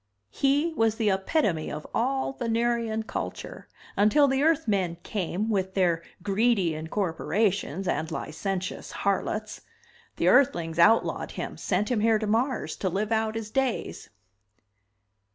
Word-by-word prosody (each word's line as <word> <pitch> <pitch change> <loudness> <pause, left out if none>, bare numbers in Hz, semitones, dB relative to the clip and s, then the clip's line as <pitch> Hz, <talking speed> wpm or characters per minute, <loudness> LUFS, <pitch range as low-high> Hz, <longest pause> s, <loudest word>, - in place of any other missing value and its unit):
He 290 +4 +1
was 225 -6 +2
the 220 -3 +1
epitome 190 - 0
of 150 - -6
all 265 +3 0
Venerian 230 -2 0
culture - - -6 0.3
until 215 +8 +4
the 270 0 +1
Earthmen 205 - +1
came 195 +1 -2
with 190 -3 -1
their 175 -4 +2 0.2
greedy 200 -4 +2
incorporations 185 +2 -1
and 160 -2 -1
licentious 185 +3 -4
harlots. 210 +2 -2 0.5
The - - 0
Earthlings 170 - +3
outlawed 225 +7 +3
him, - - -5
sent 210 - -1
him 240 - +2
here 220 +1 +3
to 215 - -3
Mars 235 +5 0
to 190 - -1
live 205 +5 -2
out 220 0 0
his 220 -1 -5
days." 265 -2 -2
215 Hz, 130 wpm, -27 LUFS, 190-235 Hz, 0.5 s, until